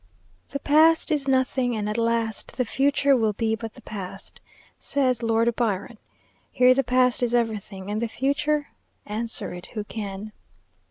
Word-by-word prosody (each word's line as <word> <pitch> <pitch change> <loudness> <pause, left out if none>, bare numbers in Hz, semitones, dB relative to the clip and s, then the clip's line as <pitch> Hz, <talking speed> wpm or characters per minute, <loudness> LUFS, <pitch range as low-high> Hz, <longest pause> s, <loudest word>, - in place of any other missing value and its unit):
"The 280 - -3
Past 315 +4 +4
is 290 -3 +1
nothing; 260 -2 +1
and 210 -1 -2
at 210 - -2
last, 230 -2 -1
The 250 - +1
Future 280 +3 +3
will 220 -4 +1
but - - -35
be 225 -1 +1
the 225 +2 -6
Past," 195 -2 -7 0.4
says 255 -4 +1
Lord 230 0 +2
Byron. 215 -1 -2 0.5
Here 250 0 +5
the 270 +1 +1
past 250 0 +2
is 245 -1 +1
everything; 210 -4 -2
and 215 +2 -2
the 235 - 0
future? 285 +5 0 0.4
Answer 225 0 -3
it 180 0 -8
who 210 - -2
can. 205 -1 -6
235 Hz, 160 wpm, -25 LUFS, 215-260 Hz, 0.5 s, Here